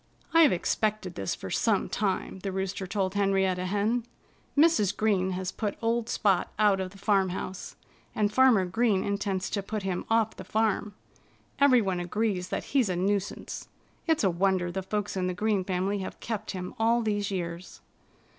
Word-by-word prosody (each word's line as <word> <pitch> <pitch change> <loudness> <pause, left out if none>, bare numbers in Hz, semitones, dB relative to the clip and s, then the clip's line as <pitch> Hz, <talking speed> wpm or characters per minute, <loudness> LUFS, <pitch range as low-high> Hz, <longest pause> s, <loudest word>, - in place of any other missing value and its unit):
"I've 330 -3 +7
expected 210 +1 -1
this 95 - -3
for 95 - -8
some 215 -4 +1
time," 195 -2 -2
the 195 +1 -4
Rooster 190 0 -3
told 190 -1 -1
Henrietta 190 -2 +1
Hen. 210 +5 0 0.5
"Mrs. 300 - +4
Green 190 -4 +1
has 185 +1 -3
put 210 -3 -3
old 230 0 0
Spot 195 -4 +1
out 205 -2 +4
of 190 -1 -3
the 200 - -15
farmhouse. 190 -2 -1 0.4
And 210 -1 +1
Farmer 250 -6 +5
Green 210 +1 +1
intends 200 -2 -1
to 200 - -1
put 210 +1 -4
him 185 -2 -2
off 225 -1 +2
the - - -7
farm. 210 -1 0 0.6
Everyone 240 -10 +4
agrees 185 0 -1
that - - -2
he's 260 -7 +3
a 180 - 0
nuisance. 195 +2 -2 0.4
It's 320 -6 +2
a 190 - +3
wonder 180 0 +1
the 190 - -3
folks 205 +2 -3
in 185 -1 0
the 180 - -2
Green 210 0 +1
family 190 +2 -1
have 190 - -6
kept 220 -2 -4
him 180 -2 -5
all 230 +1 +3
these 205 -2 -1
years." 175 -2 -5
200 Hz, 170 wpm, -28 LUFS, 185-215 Hz, 0.6 s, I've